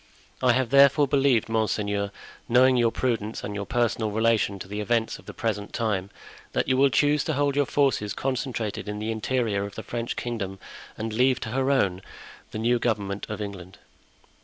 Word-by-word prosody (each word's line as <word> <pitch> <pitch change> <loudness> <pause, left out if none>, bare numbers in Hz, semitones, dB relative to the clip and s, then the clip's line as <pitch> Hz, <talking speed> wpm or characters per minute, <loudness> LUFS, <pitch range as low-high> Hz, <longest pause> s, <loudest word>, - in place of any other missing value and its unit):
I 125 -2 +4
have 130 -1 0
therefore 140 +1 +6
believed, 135 -4 +3
monseigneur, 105 -2 0 0.4
knowing 130 +2 +5
your 120 -2 +3
prudence 115 -3 -2
and 105 - -4
your 100 0 -4
personal 120 -3 0
relation 110 -2 +1
to 95 - -8
the 105 +2 -5
events 115 +1 0
of - - -18
the - - -6
present 105 -3 -3
time, 105 -5 -1 0.4
that - - 0
you 130 - +3
will 135 +1 +5
choose 145 +2 +2
to 155 - 0
hold 140 0 +1
your 145 -2 +2
forces 130 -8 +1
concentrated 120 -6 -3
in 105 - -4
the 110 +2 -3
interior 110 -2 -1
of 100 0 -7
the 110 - -6
French 120 -1 -4
kingdom 100 -6 -4 0.4
and 110 0 -4
leave 125 +3 +3
to 110 - -4
her 130 +3 0
own 95 -10 +2 0.5
the - - -6
new 120 +2 +2
government 100 -4 -2
of 105 0 -4
England. 95 -1 -8
115 Hz, 185 wpm, -26 LUFS, 105-130 Hz, 0.5 s, therefore